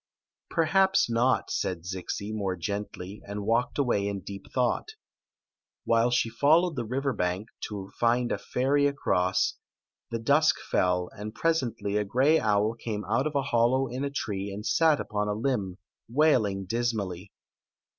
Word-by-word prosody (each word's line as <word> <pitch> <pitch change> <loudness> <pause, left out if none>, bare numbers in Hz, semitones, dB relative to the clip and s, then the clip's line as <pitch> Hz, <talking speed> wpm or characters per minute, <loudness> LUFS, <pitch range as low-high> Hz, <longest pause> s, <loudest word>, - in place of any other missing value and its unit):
"Perhaps 190 -2 +3
not," 120 +3 +1
replied 90 -3 -4
Zixi, 95 +3 -4
more 100 -4 -1
gently, 100 +1 -5
and 100 0 -5
walked 115 +3 +1
away 120 -8 +1
in 100 -1 -3
deep 100 +1 -9
thought 125 - 0 0.9
While 115 +1 +3
she 120 -1 +2
followed 155 +8 +3
the 120 -3 -3
river 135 +4 -1
bank, 90 +4 -2 0.2
to 100 -2 -7
find 120 +1 +2
a - - -1
ferry 140 +3 +1
across, 95 -10 +1 0.5
the 115 - -2
dusk 145 +7 +3
fell, 90 -1 0
and 105 +2 -7
presently 125 -10 0
a 105 - +1
gray 135 +10 +3
owl 105 0 +2
came 110 -3 -5
out 115 +8 +1
of 150 - -5
a 140 - +2
hollow 130 0 +2
in 130 +3 -4
a - - 0
tall 140 - -19
tree 100 -4 -3
and 105 +2 -7
sat 160 +1 +4
upoi||| 105 -2 -2
limb, 105 -8 -1 0.3
wailing 115 -8 +2
dismally. 105 -4 -2
115 Hz, 155 wpm, -28 LUFS, 100-135 Hz, 0.9 s, sat